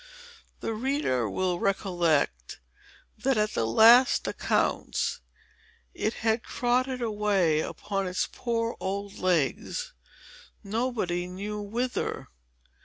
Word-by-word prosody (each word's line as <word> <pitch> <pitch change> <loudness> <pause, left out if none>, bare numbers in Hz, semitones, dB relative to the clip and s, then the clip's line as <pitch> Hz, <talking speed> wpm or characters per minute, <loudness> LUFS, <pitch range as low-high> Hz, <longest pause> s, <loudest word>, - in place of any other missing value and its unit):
The 225 - -2
reader 220 - 0
will 180 - -1
recollect, 170 - 0 0.6
that 265 +2 +1
at 210 0 +1
the 115 - 0
last 235 - +6
accounts, - - 0 0.7
it 215 - -2
had 225 +1 +2
trotted 250 +1 0
away 205 -8 +2
upon 195 +4 -3
its 180 0 0
poor 230 -1 -2
old 200 +1 -4
legs, 185 - 0 0.7
nobody 205 -5 -1
knew 205 +3 -5
whither. 235 +5 -3
210 Hz, 100 wpm, -27 LUFS, 180-235 Hz, 0.7 s, last